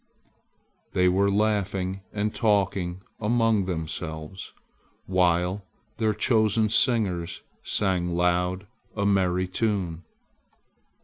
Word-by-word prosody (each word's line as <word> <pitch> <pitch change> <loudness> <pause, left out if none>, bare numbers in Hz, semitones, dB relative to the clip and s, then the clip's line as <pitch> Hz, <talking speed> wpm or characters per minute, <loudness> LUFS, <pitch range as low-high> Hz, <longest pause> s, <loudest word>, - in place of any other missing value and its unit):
They 90 0 +3
were 95 +2 +3
laughing 100 -2 0
and 105 0 -1
talking 95 -4 0 0.2
among 115 -2 +2
themselves 80 0 -5 0.5
while 90 +1 +1 0.3
their 110 -2 +1
chosen 110 -1 +2
singers 100 -8 +1 0.2
sang 95 -4 0
loud 90 +2 +1 0.3
a 100 -2 -1
merry 95 -2 +2
tune. 90 -4 -1
95 Hz, 85 wpm, -26 LUFS, 90-105 Hz, 0.5 s, They